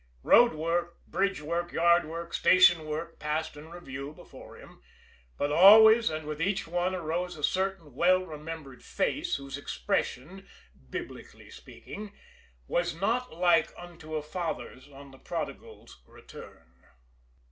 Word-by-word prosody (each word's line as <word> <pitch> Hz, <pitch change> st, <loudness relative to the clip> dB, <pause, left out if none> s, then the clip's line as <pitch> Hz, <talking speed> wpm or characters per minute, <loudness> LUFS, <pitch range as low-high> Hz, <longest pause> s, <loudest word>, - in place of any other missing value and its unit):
Road 240 Hz, 0 st, +6 dB
work, 170 Hz, +2 st, -3 dB
bridge 195 Hz, -4 st, -1 dB
work, 170 Hz, +3 st, -3 dB
yard 170 Hz, 0 st, +3 dB
work, 165 Hz, +2 st, -7 dB
station 175 Hz, -4 st, +5 dB
work 160 Hz, +2 st, -5 dB
passed 155 Hz, +1 st, -3 dB
in 150 Hz, +2 st, -12 dB
review 140 Hz, -4 st, -8 dB
before -, -, -14 dB
him, -, -, -16 dB, 0.6 s
but 145 Hz, -, -1 dB
always 220 Hz, +7 st, +8 dB
and 155 Hz, -1 st, -5 dB
with 150 Hz, +1 st, -5 dB
each 195 Hz, +1 st, -1 dB
one 175 Hz, +2 st, -1 dB
arose 175 Hz, +1 st, -3 dB
a 150 Hz, -, -10 dB
certain 190 Hz, -6 st, -1 dB
well 185 Hz, +6 st, +3 dB
remembered 155 Hz, -4 st, -9 dB
face 305 Hz, -, -2 dB
whose 140 Hz, 0 st, -7 dB
expression, 140 Hz, -, -3 dB, 0.4 s
Biblically -, -, -9 dB
speaking, 205 Hz, 0 st, -11 dB, 0.5 s
was 175 Hz, -1 st, -1 dB
not 240 Hz, +6 st, -1 dB
like 170 Hz, -1 st, +3 dB
unto 170 Hz, -3 st, -9 dB
a 155 Hz, -, -2 dB
father's 150 Hz, -6 st, -6 dB
on 140 Hz, 0 st, -13 dB
the 135 Hz, -, -16 dB
prodigal's -, -, -7 dB
return. 65 Hz, +1 st, -15 dB
165 Hz, 135 wpm, -28 LUFS, 150-185 Hz, 0.6 s, always